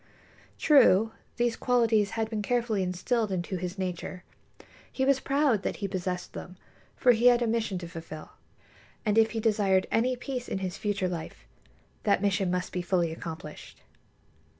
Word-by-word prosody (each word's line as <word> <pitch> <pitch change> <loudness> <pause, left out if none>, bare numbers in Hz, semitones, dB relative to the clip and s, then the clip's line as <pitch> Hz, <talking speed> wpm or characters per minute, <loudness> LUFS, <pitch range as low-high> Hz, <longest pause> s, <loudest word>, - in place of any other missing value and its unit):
True; 225 -8 +5 0.3
these 240 -1 +1
qualities 230 -5 +2
had 220 -1 0
been 220 -1 -3
carefully 230 -2 0
instilled 195 +5 -1
into 185 0 -2
his 180 +2 -5
nature. 180 -1 -4 0.7
He 265 - 0
was 275 -1 +3
proud 275 -6 +2
that - - -2
he 200 - -3
possessed 180 -1 -4
them, 180 +1 -8 0.4
for 250 - +5
he 240 +1 +4
had 245 0 +5
a - - +1
mission 220 -4 -1
to 175 -1 -6
fulfil. 165 -2 -9 0.7
And 210 -1 +2
if 225 0 +4
he 225 - -1
desired 205 -4 +2
any 250 +3 +2
peace 250 0 -5
in - - -2
his 185 -1 -3
future 205 -3 -1
life, 170 -3 -6 0.6
that 205 - +2
mission 195 -1 +1
must 180 +1 -2
be 180 - -1
fully 175 -2 +1
accomplished. 160 -2 -8
205 Hz, 165 wpm, -28 LUFS, 180-235 Hz, 0.7 s, True